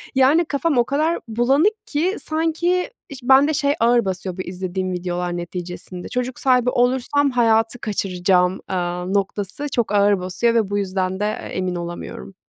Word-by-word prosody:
Yani, 285 +6 +4
kafam 290 0 0
o 240 - +4
kadar 310 +4 0
bulanık 275 - +1
ki 345 +7 0
sanki 330 +3 0 0.2
iş 280 - -8
bende 270 +4 +5
şey 285 0 +2
ağır 235 -1 +3
basıyor 190 -1 -4
bu - - -2
izlediğim 185 0 -4
videolar 175 0 -3
neticesinde 180 +1 -7
çocuk 250 0 -3
sahibi 250 -2 +3
olursam 260 +3 +2
hayatı 225 -1 +2
kaçıracağım, 185 -3 +1
aaa, 180 -1 -2
noktası 200 +7 -2
çok 235 -5 -1
ağır 205 -1 +4
basıyor 185 +6 0
ve 220 -4 +1
bu 205 - -1
yüzden 190 -1 -1
de, 210 - 0
eee, 215 - -3
emin 185 -1 -1
olamıyorum. 175 +2 -7
220 Hz, 160 wpm, -21 LUFS, 185-270 Hz, 0.2 s, bende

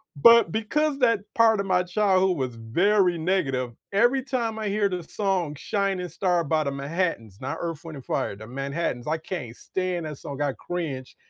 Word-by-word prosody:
But 230 +4 +7
because 280 - 0
that 230 -5 +3
part 225 -2 +5
of 200 - -1
my 185 -1 +3
childhood 185 -1 +2
was 130 -3 -2
very 175 - +2
negative, 135 -8 0 0.2
every 240 +6 +3
time 235 -5 -2
I 215 - -2
hear 205 0 +2
the 180 -2 -3
song 185 -6 -1
"Shining 195 +1 -1
Star" 180 -2 +1
by 155 0 +1
The 140 - -2
Manhattans- 140 - -2
not 130 +1 -3
Earth, 165 -2 -4
Wind& 145 -5 -8
Fire, 100 - -1
The 110 +2 -10
Manhattans- 135 0 -3
I 160 +1 +1
can't 155 -8 -6
stand 180 0 -3
that 150 -3 -6
song, 140 -1 -7
I 145 -2 +1
cringe, 150 -8 -5
175 Hz, 180 wpm, -25 LUFS, 140-200 Hz, 0.2 s, But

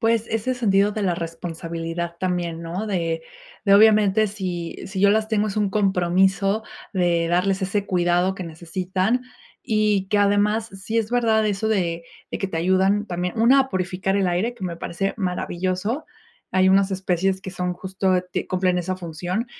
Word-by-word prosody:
Pues, 225 0 +2
ese 225 +4 -1
sentido 205 -3 +2
de 215 - -3
la 180 -3 +1
responsabilidad 165 0 -5
también, 175 -2 -2
¿no?, 180 +6 -4
de 165 -4 -1 0.4
de 200 -1 +5
obviamente, 215 0 +5
si 180 -4 -4
si 190 -1 -4
yo 200 0 +6
las 215 +1 +2
tengo, 215 -1 +1
es 200 - -5
un 205 -2 +1
compromiso 195 +1 +2 0.3
de 175 -3 +1
darles 190 +3 +1
ese 200 +1 -1
cuidado 175 +1 +2
que 190 - -6
necesitan, 185 +7 -2 0.4
y 210 -3 +1
que 205 - +2
además, 205 +2 +2
sí 195 +4 -3
es 220 0 -1
verdad 225 -3 +2
eso 205 +1 -1
de 170 -5 0 0.3
de - - -3
que 195 - -1
te 165 - -3
ayudan 190 +4 +2
también. 180 +4 -3
Una 250 +4 +6
a 265 - 0
purificar 185 +1 -1
el 195 -2 +2
aire 180 +7 0
que 195 - -7
me 170 -2 -4
parece 195 +4 -3
maravilloso, 185 - -2 0.5
hay 190 0 +4
unas 195 +1 +4
especies 190 0 0
que 190 - -7
son 180 -1 -2
justo, 190 +1 -1 0.3
cumplen 185 -1 +1
esa 185 +1 -2
función, 180 +5 -4
190 Hz, 170 wpm, -23 LUFS, 180-210 Hz, 0.5 s, yo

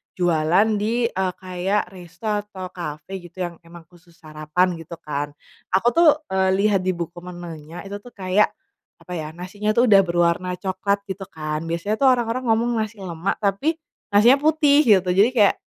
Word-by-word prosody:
jualan 175 +3 +3
di, 230 +3 0
eee, 185 -1 -1
kayak 185 +1 -2
resto 180 +3 -10
atau 205 -3 -4
cafe 170 +2 -6
gitu 175 +1 -7
yang 175 -1 -5
emang 170 0 -12
khusus 175 -1 -21
sarapan 155 +3 -1
gitu 165 +1 -9
kan, 145 -1 -4 0.4
aku 195 +5 +2
tuh, 335 -1 +6 0.2
eee, 190 0 +2
lihat 200 0 +2
di 185 - +1
buku 170 +1 -6
menunya 175 -2 -9
itu 200 +1 -7
tuh 245 +2 -15
kayak 190 +2 +2 0.5
apa 180 - -13
ya 160 -3 -4
nasinya 205 +4 -3
tuh 240 +2 +5
udah 195 - +8
berwarna 175 +1 +1
coklat 195 +2 -2
gitu 190 0 -5
kan 155 -1 -4
biasanya 170 +6 -2
tuh 275 - +4
orang-orang 245 0 +1
ngomong 230 +1 +2
nasi 215 0 -3
lemak 175 +1 -2
tapi, 205 +12 +1 0.4
nasinya 240 +7 +6
putih 300 -1 +4
gitu 190 -4 +5
jadi 200 +5 +5
kayak, 205 -3 +5
185 Hz, 170 wpm, -22 LUFS, 175-210 Hz, 0.5 s, udah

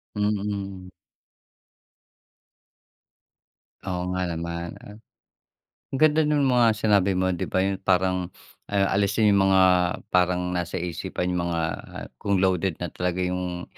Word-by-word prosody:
Mm. 100 -2 -2 3.0
Oo 90 0 -3
nga 90 0 -1
naman, 85 0 -4
ah. 105 +1 -12 1.0
Ganda 155 +2 +4
nung 150 -2 +2
mga 120 -4 +3
sinabi 100 -3 +2
mo, 95 0 +1
di 90 - -3
ba, 95 - +1
yun 95 -1 -2
parang, 90 -1 +1 0.4
ah, 100 -1 +1
alisin 100 +2 +2
yung 95 -1 +4
mga 95 -1 +5 0.5
parang 90 0 +2
nasa 90 -1 -2
isipan. 90 +1 -3
Yung 85 -1 -1
mga 85 -1 -1 0.6
kung 100 -1 +1
loaded 95 -2 +1
na 90 -2 -5
talaga 90 0 -2
yung 90 -1 -3
95 Hz, 120 wpm, -25 LUFS, 90-100 Hz, 3.0 s, mga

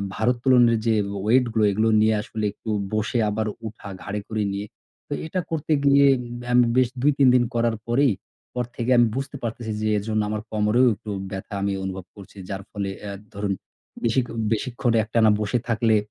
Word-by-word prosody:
ভারোত্তোলনের 120 0 +3
যে 110 - +4 0.3
weight 125 +3 +4
গুলো 110 - +2
এগুলো 110 +3 +2
নিয়ে 110 0 +4
আসলে 110 0 -4
একটু 110 - -9 0.2
বসে 110 +3 0
আবার 110 +1 -1 0.2
ওঠা 105 -1 -9
ঘাড়ে 105 0 -3
করে 110 -1 -1
নিয়ে, 100 +1 -4 0.4
তো - - -4
এটা 185 +4 -2
করতে 160 -1 0
গিয়ে 140 0 +6 0.5
আমি 125 0 +6
বেশ 125 -2 +4
২ 145 +2 +4
৩ 135 -2 +5
দিন 125 - +5
করার 115 -1 +1
পরেই, 130 0 +3 0.4
পর 125 -1 -1
থেকে 120 +1 -2
আমি 120 -1 +6
বুঝতে 135 +1 -4
পারতেছি 115 -1 -4
যে 110 - 0
এজন্য 110 +1 -1
আমার 105 0 -2
কোমরেও 110 +4 +3
একটু 110 +1 -10 0.2
ব্যথা 95 +2 -6
আমি 100 0 0
অনুভব 95 -1 -5
করছি। 100 0 -14
যার 100 0 -4
ফলে 100 -2 -3 0.2
আ - - -4 0.2
ধরুন 100 0 -1 0.5
বেশি 120 +3 +2 0.3
বেশিক্ষণ 120 +1 0
একটানা 110 0 +3
বসে 105 +3 0
থাকলে 115 -1 +2
110 Hz, 180 wpm, -24 LUFS, 105-125 Hz, 0.5 s, গিয়ে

